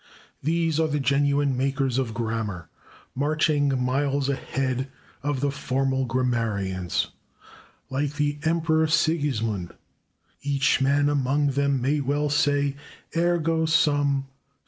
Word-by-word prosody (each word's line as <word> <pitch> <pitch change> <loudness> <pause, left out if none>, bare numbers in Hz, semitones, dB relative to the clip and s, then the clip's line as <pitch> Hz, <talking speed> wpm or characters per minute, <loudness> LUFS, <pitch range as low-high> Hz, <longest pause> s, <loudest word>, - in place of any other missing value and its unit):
These 165 +1 +1
are 160 - +3
the 150 -1 -1
genuine 140 0 +2
makers 135 0 0
of 115 -4 -2
grammar, 110 -7 -3 0.4
marching 150 +1 +1
miles 135 +2 0
ahead 135 -1 -2 0.3
of 145 -1 -2
the 140 0 +1
formal 135 -1 -1
grammarians. 110 -8 -1 0.8
Like 140 +2 -1
the 145 -1 -1
Emperor 160 0 +2
Sigismund, 140 - 0 0.7
each 140 -2 +1
man 140 +2 +3
among 145 0 +1
them 140 0 +1
may 145 +3 +1
well 145 +1 0
say: 145 -1 +2 0.4
"/Ego 165 -1 +1
sum... 145 -4 +2
140 Hz, 110 wpm, -25 LUFS, 130-150 Hz, 0.8 s, are